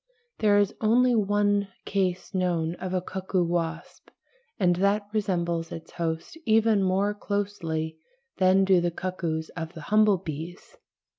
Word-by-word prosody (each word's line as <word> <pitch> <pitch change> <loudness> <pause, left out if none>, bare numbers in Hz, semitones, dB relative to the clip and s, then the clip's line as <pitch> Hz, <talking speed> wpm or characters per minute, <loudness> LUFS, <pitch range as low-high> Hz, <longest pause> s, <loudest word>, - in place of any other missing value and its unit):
There 205 -2 +4
is 205 -1 +2
only 245 +3 +4
one 205 -1 +2 0.2
case 185 -1 -1
known 175 -3 0
of 185 0 -5
a 185 -1 -1
cuckoo 190 -1 -1
wasp, 165 -1 -3 0.5
and 175 -3 +3
that 200 +2 +2
resembles 170 -5 -1
its 165 - -8
host 165 - -4
even 220 -3 +3
more 195 +2 +1
closely 175 -7 -3 0.4
than 190 +1 +5
do 190 -2 +4
the 175 - +1
cuckoos 170 -3 -3
of 165 -1 -6
the 160 - -9
humble 215 +3 +4
bees. 170 - -8
185 Hz, 140 wpm, -26 LUFS, 170-205 Hz, 0.5 s, than